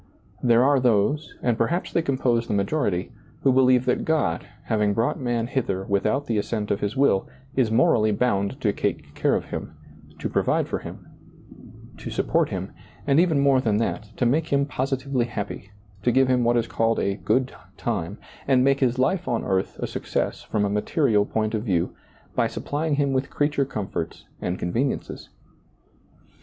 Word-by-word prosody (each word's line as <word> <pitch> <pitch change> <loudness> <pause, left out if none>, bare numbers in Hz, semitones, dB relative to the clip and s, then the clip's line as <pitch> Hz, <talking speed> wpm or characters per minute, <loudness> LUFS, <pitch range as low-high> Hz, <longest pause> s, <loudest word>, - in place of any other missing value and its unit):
There 120 -1 +4
are 140 0 +4
those, 125 +5 +1
and 120 -2 +1
perhaps 170 +11 0
they 170 - +3
compose 125 -6 0
the - - -1
majority, 100 - 0 0.3
who 135 - +4
believe 130 -1 +4
that 125 - +1
God, 150 - 0 0.2
having 105 -2 +1
brought 115 +3 0
man 120 -3 -1
hither 115 -7 -2
without 105 +8 0
the 115 -5 0
assent 105 0 -2
of 100 - 0
his 105 +5 -2
will, 135 -8 +3 0.3
is 130 -4 +2
morally 110 -2 +3
bound 100 +2 0
to 105 -4 +2
take - - -3
care - - +1
of - - -4
him, - - -5 0.4
to - - -3
provide - - +1
for - - -2
him, - - -10 0.9
to - - -7
support - - +1
him, - - -4 0.3
and 140 +1 +4
even 165 -4 +3
more 140 -2 +4
than 110 -4 +1
that, 110 -1 -2
to 125 - +1
make 150 +7 +2
him 140 0 +3
positively 135 -2 -1
happy, 105 -3 -6 0.3
to 120 - +2
give 130 +1 +4
him 125 -1 +2
what 120 +1 +3
is 115 - +1
called 115 -1 0
a 100 0 0
good 130 +3 0 0.2
time, 85 +6 -3 0.3
and 130 -2 +4
make 135 +1 +3
his 125 -2 +1
life 170 +8 +1
on 120 - 0
earth 95 -1 -1
a - - -3
success - - -2
from 105 -1 -1
a - - 0
material 105 0 +2
point 110 0 -1
of 110 - 0
view 90 -6 0 0.4
by - - +2
supplying 150 +1 -2
him 140 -1 +1
with 130 +1 0
creature 145 -1 +1
comforts 100 -9 -5 0.2
and 90 +1 -2
conveniences. 120 +11 -2
120 Hz, 180 wpm, -24 LUFS, 105-135 Hz, 0.9 s, There